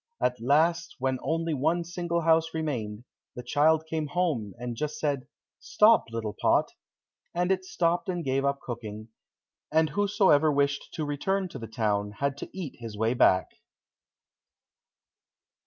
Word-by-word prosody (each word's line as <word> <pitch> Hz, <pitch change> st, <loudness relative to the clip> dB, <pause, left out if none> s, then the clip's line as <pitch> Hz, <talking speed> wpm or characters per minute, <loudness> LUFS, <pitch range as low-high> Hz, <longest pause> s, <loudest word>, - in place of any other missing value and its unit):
At 125 Hz, -2 st, 0 dB
last 165 Hz, +6 st, +2 dB
when 130 Hz, -1 st, -1 dB
only 165 Hz, 0 st, -1 dB
one 160 Hz, +5 st, +1 dB
single 170 Hz, 0 st, -2 dB
house 160 Hz, 0 st, +2 dB
remained, 120 Hz, -9 st, -3 dB, 0.3 s
the 125 Hz, -, -6 dB
child 155 Hz, +5 st, +3 dB
came 160 Hz, -1 st, -2 dB
home 145 Hz, -, -1 dB
and 120 Hz, 0 st, -5 dB
just 150 Hz, +5 st, -3 dB
said, 140 Hz, -4 st, -2 dB, 0.3 s
"Stop, 230 Hz, -9 st, +4 dB
little 115 Hz, -2 st, -4 dB
pot," -, -, +3 dB, 0.6 s
and 180 Hz, +2 st, +1 dB
it 190 Hz, 0 st, +1 dB
stopped 175 Hz, 0 st, 0 dB
and 175 Hz, -2 st, -2 dB
gave 135 Hz, +1 st, +1 dB
up 140 Hz, 0 st, 0 dB
cooking, 110 Hz, -2 st, -7 dB, 0.6 s
and 160 Hz, 0 st, +3 dB
whosoever 195 Hz, -7 st, +3 dB
wished 140 Hz, 0 st, 0 dB
to 155 Hz, -, -3 dB
return 185 Hz, +6 st, -1 dB
to -, -, -8 dB
the 115 Hz, -, -7 dB
town 105 Hz, -2 st, -1 dB
had 140 Hz, +5 st, -1 dB
to -, -, -7 dB
eat 180 Hz, -7 st, -7 dB
his 115 Hz, -3 st, -7 dB
way 110 Hz, +2 st, +1 dB
back. 95 Hz, -6 st, +4 dB
145 Hz, 150 wpm, -28 LUFS, 120-170 Hz, 0.6 s, Stop